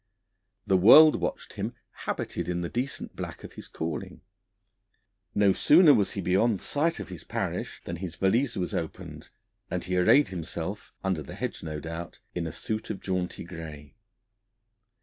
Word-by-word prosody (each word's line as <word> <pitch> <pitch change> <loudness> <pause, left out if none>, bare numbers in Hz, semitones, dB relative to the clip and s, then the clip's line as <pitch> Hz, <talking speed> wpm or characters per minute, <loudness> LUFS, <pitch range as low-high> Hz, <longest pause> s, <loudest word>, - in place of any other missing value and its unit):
The 95 - +4
world 150 - +9
watched - - -4
him, - - -4 0.2
habited - - -4
in 90 0 -1
the 85 - -3
decent 130 +4 -3
black - - -6
of - - -9
his - - -10
calling; 80 -2 -5 1.1
no 100 -2 +5
sooner 155 - +7
was 100 -6 +2
he 100 - -3
beyond 95 +4 +2
sight 165 +4 0
of - - -7
his 90 -4 -8
parish - - -4
than 85 - -4
his 85 -2 -5
valise 115 +8 +2
was 90 -2 -2
opened, 80 -2 -5 0.4
and 90 - -2
he 90 +2 -2
arrayed 135 +11 +5
himself 90 +2 -5
under 95 -4 0
the 75 - -9
hedge, - - -4
no 75 -1 -5
doubt 85 +2 -7 0.2
in 85 -2 -2
a - - -4
suit 110 +7 -4
of 95 - -3
jaunty 90 -2 -3
grey. 80 -4 -9
90 Hz, 165 wpm, -28 LUFS, 85-110 Hz, 1.1 s, world